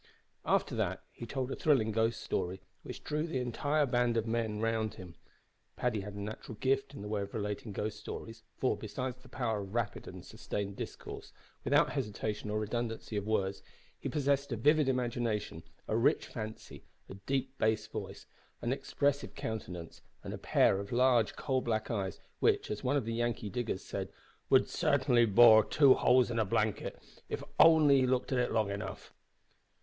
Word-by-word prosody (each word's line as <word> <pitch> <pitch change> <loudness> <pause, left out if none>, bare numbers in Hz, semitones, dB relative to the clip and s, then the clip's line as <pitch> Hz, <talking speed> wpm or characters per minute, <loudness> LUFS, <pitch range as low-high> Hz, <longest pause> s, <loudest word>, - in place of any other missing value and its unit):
After - - +2
that - - -1
he 120 - -9
told 130 +1 -3
a - - -2
thrilling 130 -8 +2
ghost 115 +1 0
story, 95 0 -2 0.2
which - - -8
drew 150 +2 -1
the 145 - -2
entire 145 +5 +1
band 120 -2 +1
of 115 - +1
men 110 -2 -1
round 110 -1 0
him. 90 -4 -10 0.6
Paddy 115 -5 0
had 100 +1 -7
a - - -6
natural 110 +2 -6
gift 135 +1 0
in 100 - -7
the - - -5
way 105 -1 -1
of 100 +2 -6
relating 105 +1 -3
ghost 105 +2 -3
stories, 115 +1 -7 0.2
for, 130 - +1
besides 125 +4 -4
the 130 - -16
power 115 -5 -1
of 100 +2 -8
rapid 120 -4 -2
and - - -9
sustained 100 -1 -4
discourse, - - -7 0.3
without 145 +5 +3
hesitation 105 -5 -3
or 105 - -1
redundancy 115 +1 -3
of 100 0 -2
words, 100 -3 0 0.4
he - - -3
possessed 140 -2 0
a - - 0
vivid 150 +4 +4
imagination, 120 -8 -1 0.3
a - - 0
rich 115 +4 +3
fancy, 110 -1 -8 0.2
a - - -9
deep 130 +7 -2
bass 110 0 +2
voice, - - -7 0.4
an 120 - +1
expressive 140 +1 -1
countenance, 90 -7 -6 0.2
and - - -5
a - - -4
pair 95 - +3
of 100 0 -6
large 120 -2 +3
coal 130 -2 0
black 110 -2 -1
eyes, 95 -5 -2 0.2
which, - - +2
as 105 - -4
one 135 +3 +2
of 130 - -1
the 115 - -2
Yankee 115 -3 -1
diggers 120 -6 -2
said, - - -4 0.4
"would - - +5
sartinly 130 -5 +3
bore 110 +1 +8
two 140 +3 +6
holes 125 -1 +4
in 115 - 0
a - - +4
blanket 105 +1 -1 0.3
if - - -3
he - - -8
only 145 -5 +7
looked 130 +1 0
at 130 - +2
it 125 - +1
long 110 -3 +1
enough." 100 - -6
115 Hz, 185 wpm, -32 LUFS, 105-130 Hz, 0.6 s, bore